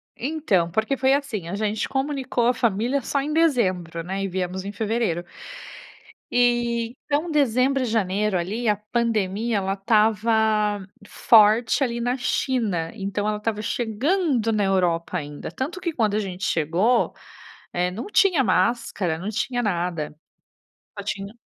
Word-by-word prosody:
Então, 250 Hz, -, 0 dB
porque 220 Hz, +7 st, 0 dB
foi 265 Hz, +1 st, +3 dB
assim, 270 Hz, -, -2 dB
a 180 Hz, -, -4 dB
gente 210 Hz, 0 st, -1 dB
comunicou 270 Hz, -3 st, -1 dB
a 250 Hz, -, +4 dB
família 235 Hz, +4 st, 0 dB
só 275 Hz, +3 st, -1 dB
em 300 Hz, +2 st, -3 dB
dezembro, 185 Hz, -, +1 dB
né, 195 Hz, +2 st, -3 dB
e -, -, -1 dB
viemos 185 Hz, 0 st, -3 dB
em 200 Hz, -, -4 dB
fevereiro. 210 Hz, -5 st, -1 dB, 1.1 s
E, 240 Hz, -1 st, +2 dB, 0.2 s
então 300 Hz, +3 st, -1 dB
dezembro 270 Hz, -2 st, +2 dB
e -, -, 0 dB
janeiro, 210 Hz, -2 st, 0 dB
ali, 210 Hz, +7 st, -2 dB
a 210 Hz, -, +4 dB
pandemia, 215 Hz, 0 st, -1 dB
ela 195 Hz, -1 st, -1 dB
estava 215 Hz, 0 st, +2 dB, 0.2 s
forte 225 Hz, +5 st, +4 dB
ali 235 Hz, -1 st, -3 dB
na 245 Hz, +2 st, 0 dB
China, 220 Hz, -10 st, -1 dB
então 205 Hz, -1 st, -3 dB
ela 210 Hz, 0 st, 0 dB
estava 210 Hz, 0 st, -2 dB
chegando 240 Hz, -, 0 dB
na 210 Hz, -2 st, +1 dB
Europa 180 Hz, -3 st, 0 dB
ainda, 145 Hz, -2 st, -6 dB
tanto 295 Hz, +8 st, -4 dB
que 345 Hz, -3 st, -3 dB
quando 215 Hz, -6 st, +1 dB
a 215 Hz, -, +2 dB
gente 190 Hz, -2 st, -5 dB
chegou, 180 Hz, +10 st, +1 dB, 0.6 s
eh, 180 Hz, 0 st, 0 dB
não 215 Hz, -, -6 dB
tinha 350 Hz, -10 st, +4 dB
máscara, 185 Hz, -3 st, +1 dB
não 190 Hz, +6 st, -4 dB
tinha 245 Hz, +3 st, -1 dB
nada. 175 Hz, -7 st, -2 dB, 0.8 s
Só 200 Hz, -, -5 dB
tinha 200 Hz, +2 st, -5 dB
215 Hz, 150 wpm, -23 LUFS, 190-245 Hz, 1.1 s, a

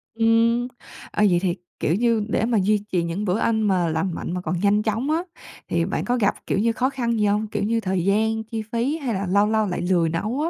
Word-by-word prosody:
Ừm, 230 Hz, +1 st, +3 dB, 0.4 s
ờ, 210 Hz, -, +1 dB
vậy 175 Hz, -1 st, +3 dB
thì, 180 Hz, -2 st, 0 dB, 0.2 s
kiểu, 160 Hz, -, +1 dB
như 225 Hz, 0 st, +1 dB
để 215 Hz, -, +1 dB
mà 230 Hz, -1 st, +1 dB
duy 205 Hz, +1 st, +1 dB
trì 175 Hz, -2 st, +1 dB
những 170 Hz, +5 st, -3 dB
bữa 185 Hz, +1 st, +1 dB
ăn 220 Hz, -1 st, +1 dB
mà 185 Hz, -3 st, +2 dB
lành 165 Hz, +3 st, -1 dB
mạnh -, -, -5 dB
mà 180 Hz, -, -3 dB
còn 180 Hz, -1 st, -2 dB
nhanh 205 Hz, +2 st, +2 dB
chóng 225 Hz, +7 st, -1 dB
á 325 Hz, +2 st, +1 dB, 0.4 s
thì 170 Hz, 0 st, 0 dB
bạn 190 Hz, -, -2 dB
có 245 Hz, +1 st, +1 dB
gặp, 205 Hz, -4 st, +2 dB
kiểu -, -, +1 dB
như, 230 Hz, +3 st, +2 dB
khó 255 Hz, +3 st, +1 dB
khăn 235 Hz, -4 st, -1 dB
gì 210 Hz, -, +2 dB
hông? 210 Hz, +1 st, +1 dB
Kiểu 210 Hz, -1 st, -3 dB
như 230 Hz, +2 st, +1 dB
thời 185 Hz, -4 st, -1 dB
gian, 220 Hz, +2 st, +1 dB
chi 220 Hz, 0 st, -5 dB
phí 245 Hz, +7 st, 0 dB
hay 270 Hz, -7 st, -3 dB
là 195 Hz, -1 st, -2 dB
lâu 200 Hz, +3 st, +3 dB
lâu 220 Hz, 0 st, +2 dB
lại 180 Hz, -, -3 dB
lười 175 Hz, -2 st, +2 dB
nấu 215 Hz, -, -2 dB
á? 325 Hz, -, 0 dB
210 Hz, 255 wpm, -23 LUFS, 185-230 Hz, 0.4 s, Ừm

